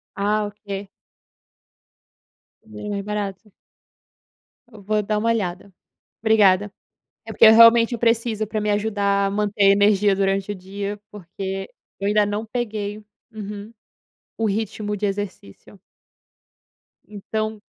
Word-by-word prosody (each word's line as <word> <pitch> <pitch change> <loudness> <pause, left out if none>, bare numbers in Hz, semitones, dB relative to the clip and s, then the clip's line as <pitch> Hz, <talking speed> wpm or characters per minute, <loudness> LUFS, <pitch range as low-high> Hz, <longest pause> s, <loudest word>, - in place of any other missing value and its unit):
Ah, 210 +1 0
ok. 200 -1 -7 1.8
Bem 210 -1 -9
mais 200 -1 -3
barato. 205 0 -5 1.2
Eu 215 -2 -13
vou 210 +2 0
dar 210 +1 -1
uma 230 +2 0
olhada, 195 -3 -2 0.5
obrigada. 205 -3 +4 0.5
É - - -7
porque 230 - +5
eu 220 - +9
realmente 230 +1 +7
preciso 230 -2 0
pra 215 +1 -3
me 210 0 0
ajudar 200 -1 +1
a - - -3
manter 205 0 0
energia 205 0 +3
durante 195 +1 0
o - - -4
dia, 200 +2 -6
porque 195 0 -6 0.3
eu 200 - -2
ainda 210 0 +3
não 205 +2 -3
peguei 215 -3 -3 0.3
uhum, 210 0 -8 0.7
o 225 - -2
ritmo 210 0 -2
de 205 +1 -1
exercício. 195 - -7 1.3
Então 215 +1 -4
205 Hz, 120 wpm, -22 LUFS, 200-215 Hz, 1.8 s, eu